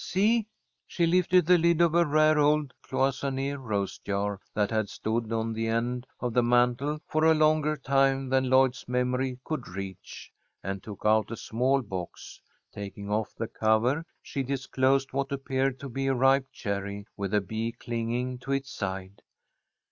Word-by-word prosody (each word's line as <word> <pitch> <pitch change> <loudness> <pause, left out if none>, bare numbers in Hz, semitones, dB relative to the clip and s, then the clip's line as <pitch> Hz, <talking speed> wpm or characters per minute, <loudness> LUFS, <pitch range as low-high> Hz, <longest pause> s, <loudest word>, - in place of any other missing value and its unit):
See?" 215 +3 +2 0.4
She 170 - +1
lifted 180 0 +4
the 180 +1 +5
lid 170 0 +3
of 170 -2 +4
a 170 0 +5
rare 155 +1 +4
old 150 -2 +2
cloisonné 135 +1 -1
rose 105 -8 -3
jar 100 0 -2 0.2
that 105 0 +1
had 110 -2 0
stood 110 +1 -2
on 115 0 -1
the 115 0 -2
end 120 +2 -1
of 120 -2 -2
the 125 - +4
mantel 125 +5 +2
for 155 0 0
a 160 0 +6
longer 155 0 +3
time 135 -1 +2
than 130 0 +1
Lloyd's 130 -1 +3
memory 125 +1 0
could 155 -6 -4
reach, 95 0 -8 0.3
and 95 0 -4
took 105 -2 -10
out 110 -1 +3
a 115 - -5
small 130 +4 0
box. 95 -5 -7 0.3
Taking 100 0 -7
off 110 0 -1
the 115 - -3
cover, 110 +9 +1 0.2
she 140 - -3
disclosed 135 0 0
what 135 0 -1
appeared 135 -1 -1
to 140 - -5
be 135 +2 -3
a 135 - +2
ripe 135 +1 +3
cherry 100 0 -4
with 100 -2 -3
a - - +5
bee 110 +4 -3
clinging 120 +2 -3
to 135 +2 -3
its 135 -1 -2
side. 95 0 -5
125 Hz, 170 wpm, -28 LUFS, 110-140 Hz, 0.4 s, a